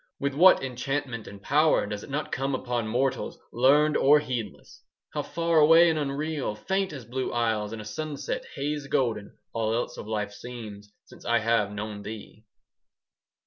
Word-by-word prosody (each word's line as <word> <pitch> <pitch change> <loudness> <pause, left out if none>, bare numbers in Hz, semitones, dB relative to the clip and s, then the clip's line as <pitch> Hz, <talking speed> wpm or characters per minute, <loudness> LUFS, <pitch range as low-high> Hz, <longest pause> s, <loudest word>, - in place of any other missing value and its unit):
With 140 0 -1
what 180 +3 +6
enchantment 130 -2 -3
and 100 - -10
power 150 +7 +3
Does 105 0 -5
it - - -11
not 145 +3 -3
come 135 +1 -1
upon 125 -3 -2
mortals, 130 +3 -1 0.2
Learned 145 +5 +4
or 145 +2 +6
heedless! 125 -8 -5 0.3
How - - -1
far 165 -1 +1
away 165 +2 +7
and 155 - -1
unreal, 145 -4 -2
5 105 - -20
Faint 190 0 0
as 135 -6 -8
blue 130 +3 -3
isles 110 -3 0
in 115 - -6
a 105 - -8
sunset 145 +5 -4
Haze 145 0 -3
golden, 115 -7 -1 0.2
all 115 -1 0
else 120 - -3
of - - -8
life 105 -1 -2
seems, 105 -3 -9
Since - - -16
I 120 0 +3
have 115 -2 +1
known 105 0 -5
thee! 110 +1 -9
125 Hz, 175 wpm, -27 LUFS, 110-145 Hz, 0.3 s, away